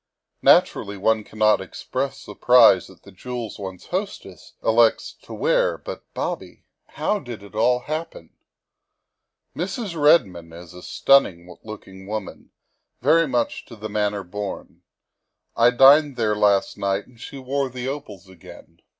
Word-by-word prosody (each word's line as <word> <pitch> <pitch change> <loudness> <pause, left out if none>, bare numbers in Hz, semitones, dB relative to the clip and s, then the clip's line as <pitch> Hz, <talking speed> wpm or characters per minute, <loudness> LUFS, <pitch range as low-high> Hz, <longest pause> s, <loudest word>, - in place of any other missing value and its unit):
Naturally 100 0 +3
one 110 +2 +1
cannot 110 -1 +1
express 130 +8 -5
surprise 120 -7 +4
at 95 - -18
the 100 - -15
jewels 120 +3 -7
one's 95 -2 -8
hostess 185 - -6
elects 115 0 +2
to - - -15
wear, - - +1
but, - - -10
Bobby, - - -5 0.2
how 210 - -2
did 120 - -9
it 100 - -14
all 125 +3 +2
happen? 160 - -6 1.2
Mrs. 215 - -4
Redmond 95 - +2
is 85 0 -12
a 90 - -11
stunning 90 -12 +2
looking 95 -3 -11
woman, 105 -1 -7 0.5
very 165 0 +4
much 120 -3 -2
to 115 - -11
the 110 0 -7
manner 105 -1 -1
born. 100 +2 -7 0.7
I 115 +1 +5
dined 135 +3 +5
there 110 -3 0
last 100 -1 +1
night 100 0 -1
and 120 -2 -22
she 140 - -9
wore 135 +1 -2
the 125 0 -6
opals 110 -10 -7
again. 85 -2 -15
110 Hz, 140 wpm, -22 LUFS, 100-135 Hz, 1.2 s, I